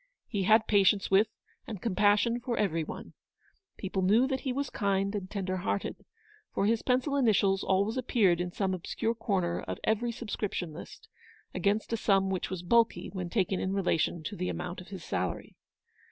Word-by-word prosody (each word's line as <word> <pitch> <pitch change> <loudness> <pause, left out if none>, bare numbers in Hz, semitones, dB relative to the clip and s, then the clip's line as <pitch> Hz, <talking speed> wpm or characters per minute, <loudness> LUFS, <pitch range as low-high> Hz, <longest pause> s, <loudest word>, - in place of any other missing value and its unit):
He 200 -4 -1
had 220 +2 +5
patience 200 -1 +3
with 200 +3 +5 0.4
and 215 -4 -5
compassion 210 +3 +2
for 240 -1 -3
every 165 -6 +1
one. - - -8 0.6
People 190 -1 -2
knew 210 +7 +4
that 265 -1 -1
he 265 - -3
was 275 +1 -2
kind 200 -1 0
and 195 -3 -4
tender 190 -2 -2
hearted; 195 +2 -3 0.5
for - - +1
his 225 +1 +2
pencil 260 +3 +1
initials 205 -7 +3
always 200 +5 +1
appeared 205 -9 +2
in 175 0 -3
some 190 0 -1
obscure 205 +5 -2
corner 195 -6 -1
of - - -5
every 230 +2 +1
subscription 210 -7 -4
list, 160 - -11 0.5
against 210 +3 0
a - - +1
sum 195 -3 +2
which 185 - -2
was 185 -2 -5
bulky 230 +5 +2
when 180 -3 -4
taken 190 -2 0
in 190 - -1
relation 175 -4 0
to 205 - -5
the 180 -1 -2
amount 180 0 -5
of 180 - -13
his 190 -4 -8
salary. 90 - -3
200 Hz, 180 wpm, -30 LUFS, 185-225 Hz, 0.6 s, had